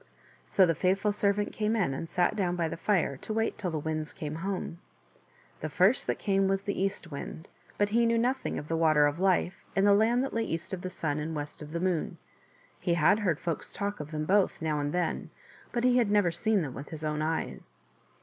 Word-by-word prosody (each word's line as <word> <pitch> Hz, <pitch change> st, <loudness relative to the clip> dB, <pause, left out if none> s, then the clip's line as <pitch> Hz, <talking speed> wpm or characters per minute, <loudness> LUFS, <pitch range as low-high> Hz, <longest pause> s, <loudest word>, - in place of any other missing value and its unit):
So 190 Hz, -, +5 dB
the 165 Hz, -, +2 dB
faithful 190 Hz, +5 st, +1 dB
servant 205 Hz, 0 st, 0 dB
came 215 Hz, +1 st, 0 dB
in 185 Hz, -11 st, +1 dB
and 160 Hz, +5 st, -5 dB
sat 175 Hz, -1 st, +1 dB
down 180 Hz, -4 st, 0 dB
by 170 Hz, -2 st, 0 dB
the -, -, -4 dB
fire 170 Hz, -7 st, +1 dB
to 215 Hz, -, -5 dB
wait 225 Hz, +1 st, -1 dB
till 185 Hz, -, -1 dB
the 160 Hz, -, -2 dB
Winds 155 Hz, 0 st, -3 dB
came 155 Hz, 0 st, -5 dB
home. 190 Hz, -3 st, -3 dB, 0.8 s
The -, -, -4 dB
first -, -, +3 dB
that -, -, 0 dB
came 195 Hz, -2 st, +1 dB
was 195 Hz, 0 st, 0 dB
the 200 Hz, -1 st, -2 dB
East 195 Hz, -3 st, -2 dB
Wind; 145 Hz, +3 st, -7 dB, 0.3 s
but 205 Hz, 0 st, +2 dB
he 230 Hz, +2 st, +3 dB
knew 230 Hz, 0 st, +2 dB
nothing 255 Hz, +3 st, 0 dB
of 150 Hz, -, -6 dB
the 165 Hz, -, -1 dB
Water 155 Hz, -2 st, +4 dB
of 145 Hz, +3 st, 0 dB
Life 185 Hz, -1 st, +1 dB
and 195 Hz, -, +3 dB
the 205 Hz, -, +6 dB
land 230 Hz, +5 st, +3 dB
that 270 Hz, -, -3 dB
lay 230 Hz, -, 0 dB
east 165 Hz, -2 st, -4 dB
of 185 Hz, -, -3 dB
the 185 Hz, -, -4 dB
Sun 155 Hz, -4 st, -2 dB
and 155 Hz, +1 st, -3 dB
west 150 Hz, +1 st, -5 dB
of 150 Hz, 0 st, -8 dB
the 170 Hz, -, -2 dB
Moon; 180 Hz, -2 st, -1 dB, 0.6 s
he 170 Hz, -, +1 dB
had 170 Hz, +6 st, +4 dB
heard 180 Hz, -8 st, 0 dB
folks 170 Hz, -2 st, -3 dB
talk 205 Hz, 0 st, -3 dB
of 150 Hz, 0 st, -6 dB
them 155 Hz, -1 st, -3 dB
both 195 Hz, +3 st, +2 dB
now 155 Hz, -2 st, -1 dB
and 145 Hz, 0 st, -1 dB
then, 180 Hz, +1 st, -1 dB, 0.4 s
but 240 Hz, -1 st, -1 dB
he 250 Hz, 0 st, +4 dB
had 235 Hz, -4 st, +3 dB
never 205 Hz, -4 st, +3 dB
seen 200 Hz, +3 st, +1 dB
them 135 Hz, -4 st, -5 dB
with 140 Hz, -, -8 dB
his 160 Hz, -1 st, -7 dB
own 150 Hz, 0 st, -1 dB
eyes. 160 Hz, +1 st, -3 dB
180 Hz, 235 wpm, -29 LUFS, 155-205 Hz, 0.8 s, the